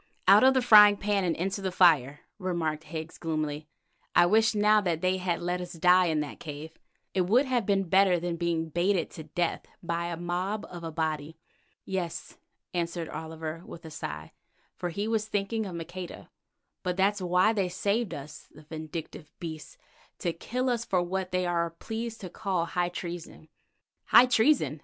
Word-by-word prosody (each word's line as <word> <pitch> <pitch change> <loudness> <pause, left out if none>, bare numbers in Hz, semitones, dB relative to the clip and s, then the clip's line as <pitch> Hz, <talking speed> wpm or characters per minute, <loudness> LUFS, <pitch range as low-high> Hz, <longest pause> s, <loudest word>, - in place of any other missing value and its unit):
"Out 200 +4 +8
of 265 0 +6
the 260 - +3
frying 210 -3 +8
pan 195 -5 0
into 195 +3 -2
the 190 -1 -2
fire," 150 -7 +4 0.2
remarked 165 -4 -2
Higgs 160 +1 -7
gloomily. 155 -2 -3 0.5
"I 175 - +7
wish 220 +4 +3
now 210 +1 +4
that 170 -4 -1
they 185 0 +1
had 180 -2 -2
let 180 +1 -1
us 180 - -7
die 180 +2 +4
in 155 -2 +1
the 150 - -5
cave. 155 0 -7 0.4
It 185 -2 +1
would 245 +8 +4
have 245 -5 0
been 195 -1 +2
better 190 0 +4
than 175 0 -2
being 165 -1 -1
baited 175 +3 0
to 160 - -9
death 170 +2 -2 0.2
by 170 0 -2
a 170 -1 -4
mob 180 +5 -2
of 175 -1 -8
Abati." 160 -1 -3 0.5
"Yes," 185 -3 -4 0.3
answered 170 -1 -2
Oliver 160 0 -6
with 170 -1 -11
a 160 - -8
sigh, 75 - -6 0.4
for 175 - -3
he 200 +5 -3
was 220 -1 0
thinking 210 +1 -1
of 180 - -6
Maqueda, 175 +2 -7 0.5
"but 180 -1 -2
that's 200 +1 +2
why 180 +4 +3
they 195 -4 0
saved 200 +1 -1
us, 145 +1 -10
the 155 - -15
vindictive 155 0 -7
beasts, 160 -4 -7 0.4
to 170 - -2
kill 250 +9 -3
us 235 -1 -1
for 185 -5 +1
what 185 +1 -3
they 185 0 0
are 170 -1 0
pleased 225 +7 -6
to 185 - -6
call 185 -3 -1
high 175 +1 -1
treason." 175 -3 -7 0.6
"High 250 - +7
treason!" 250 - +2
175 Hz, 175 wpm, -28 LUFS, 165-195 Hz, 0.6 s, Out